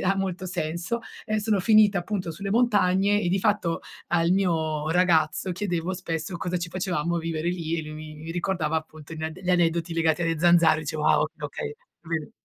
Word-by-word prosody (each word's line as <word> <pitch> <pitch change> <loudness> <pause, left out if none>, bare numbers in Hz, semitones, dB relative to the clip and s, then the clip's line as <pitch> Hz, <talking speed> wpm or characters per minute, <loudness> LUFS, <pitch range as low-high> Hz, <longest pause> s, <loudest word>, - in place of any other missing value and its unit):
e - - -3
ha 195 +1 +3
molto 185 -1 -2
senso, 170 +6 -3 0.2
ehm, 215 -1 0
sono 210 -1 +1
finita 210 -1 +5
appunto 180 -1 -3
sulle 195 +5 -5
montagne 205 -3 +3
e 175 - 0
di 190 +1 +1
fatto 205 -6 +1 0.3
al 170 0 +2
mio 160 -5 +1
ragazzo 175 0 +2
chiedevo 180 -1 -2
spesso 165 0 -4
cosa 180 +1 -2
ci 170 0 -4
facevamo 175 -2 -1
a - - +1
vivere 165 0 -2
lì 170 -2 -2
e - - -3
lui 155 0 -8
mi 155 0 -8
mi - - -5
ricordava 170 -2 -1
appunto 155 -1 -7
gli 160 - -7
ad 160 0 -4
gli 185 - -1
aneddoti 170 -1 +2
legati 165 0 +2
alle 165 -1 0
zanzare. 165 -2 +5
Diceva: 155 0 0
"Ah - - +4
okay, 155 +2 -1
okay, 145 0 -4 0.3
bene" 160 -3 -3
170 Hz, 200 wpm, -26 LUFS, 160-185 Hz, 0.3 s, finita